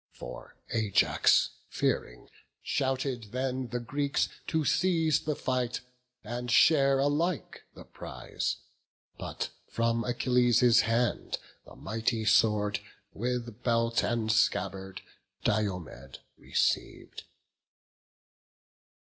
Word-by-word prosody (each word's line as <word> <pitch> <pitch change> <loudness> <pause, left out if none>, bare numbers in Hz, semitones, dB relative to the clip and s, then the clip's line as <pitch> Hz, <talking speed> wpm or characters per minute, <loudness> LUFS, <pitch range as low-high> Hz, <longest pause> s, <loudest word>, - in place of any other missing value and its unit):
For - - -10 0.2
Ajax 110 -4 +3 0.2
fearing, - - -2 0.4
shouted 130 -3 -1
then 130 +3 -2
the 120 +1 -3
Greeks 140 +4 -1 0.2
To 160 -2 0
cease 165 -3 +2
the 150 -1 -2
fight, 125 -2 -1 0.4
and 120 +2 -5
share 135 +1 +5
alike 145 +4 -1
the - - -11
prize; 60 -1 -4 0.6
But - - -4 0.2
from 115 0 0
Achilles' 125 -1 +4
hand 115 +1 0 0.3
the - - -13
mighty 110 +2 -2
sword, 105 -1 +3 0.3
With 120 0 -3
belt 115 -1 +1
and 115 -2 0
scabbard, 95 -3 0 0.4
Diomed 90 - -2 0.2
receiv'd. - - -2
120 Hz, 90 wpm, -29 LUFS, 110-130 Hz, 0.6 s, share